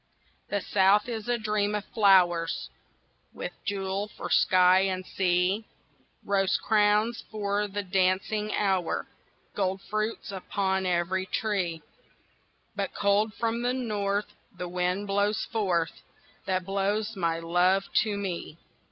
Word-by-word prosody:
THE 205 - -1
South 200 +3 +3
is 225 -1 -5
a 240 - +2
dream 210 -1 0
of 210 0 -3
flowers 180 -5 +3 0.6
With - - -5
a - - -34
jewel 195 0 -2
for - - -8
sky 185 0 +5
and 185 -1 -1
sea, 185 +3 +1 0.6
Rose 195 -1 +2
crowns 215 +2 +2
for 205 -1 -1
the 205 0 -4
dancing 190 +3 0
hours, 190 -4 0 0.5
Gold 190 -1 -1
fruits 215 +2 -3
upon 190 0 -1
every 180 +2 0
tree; 185 -9 -1 0.9
But - - -3
cold 205 +2 +2
from 230 0 -1
the 245 +1 +1
North 210 -4 -2 0.2
The 180 - -4
wind 180 +3 -1
blows 205 +2 0
forth 185 -7 -1 0.5
That 185 -1 0
blows 205 +3 -1
my 170 -3 0
love 175 +3 +2 0.2
to 210 -3 -2
me. 180 -5 -4
200 Hz, 125 wpm, -27 LUFS, 185-210 Hz, 0.9 s, sky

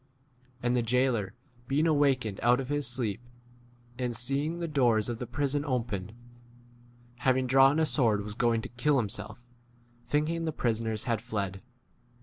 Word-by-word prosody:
And 120 0 +2
the 125 - +2
jailor 115 -3 +1 0.3
being 145 +4 +2
awakened 135 -9 +2
out 120 +1 +4
of 135 -1 -5
his 145 -2 0
sleep, 120 -4 -2 0.8
and 125 -2 -2
seeing 140 +7 -1
the 170 -1 -3
doors 120 -7 +2
of 120 -1 -4
the 125 - -5
prison 145 +3 -1
opened, 115 -8 -2 1.1
having 130 +1 +2
drawn 135 +3 +5
a 160 - +3
sword 115 -9 +1
was 105 0 -6
going 115 0 +1
to - - -6
kill 140 +4 +1
himself, 115 +1 -4 0.6
think 150 +1 +2
28 165 +2 -1
ing 165 - -3
the 160 - 0
prisoners 110 -3 -1
had 115 -3 -1
fled. 100 -5 -4
125 Hz, 160 wpm, -29 LUFS, 115-140 Hz, 1.1 s, drawn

